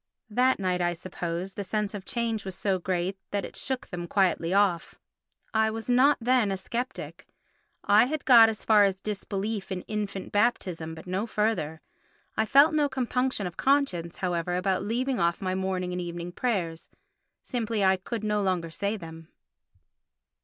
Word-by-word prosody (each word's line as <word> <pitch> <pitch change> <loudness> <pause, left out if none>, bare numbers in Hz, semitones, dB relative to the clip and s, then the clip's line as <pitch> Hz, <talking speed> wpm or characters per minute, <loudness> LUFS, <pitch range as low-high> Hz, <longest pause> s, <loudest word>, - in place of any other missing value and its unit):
That 255 +4 +3
night, 180 -2 0
I 175 0 +1
suppose, 175 +1 -5
the 200 - -4
sense 210 +2 -2
of 200 -2 -6
change 230 -3 -2
was 190 -2 -6
so 190 0 0
great 185 +1 -2
that 200 -1 -2
it - - -10
shook 265 -1 -3
them 175 -1 -5
quietly 180 -3 +1
off. 195 -3 +2 0.6
I 220 0 +3
was 225 +2 -3
not 265 +4 +5
then 245 -2 +2
a 195 - -1
sceptic; 245 +7 -5 0.6
I 210 +3 +6
had 300 +3 -3
got 235 -4 +8
as 220 - -5
far 215 -2 +6
as 195 -1 +1
disbelief 205 0 -4
in 180 -1 -3
infant 205 -3 -4
baptism 180 -7 0
but 160 - -11
no 190 +5 -2
further. 210 -9 -1 0.5
I 220 - +1
felt 285 +6 +6
no 295 -2 +2
compunction 255 -4 -1
of 175 -1 -6
conscience, 260 -12 +1
however, 175 -1 -1
about 185 +1 0
leaving 245 +5 -1
off 170 0 +1
my 185 -1 -2
morning 185 -1 -2
and 180 0 -3
evening 175 0 -5
prayers—simply 215 +3 -4
I 190 0 +4
could 215 +4 -5
no 210 -1 +1
longer 180 -4 -1
say 200 +5 -2
them. 165 -3 -10
200 Hz, 165 wpm, -27 LUFS, 180-225 Hz, 0.6 s, got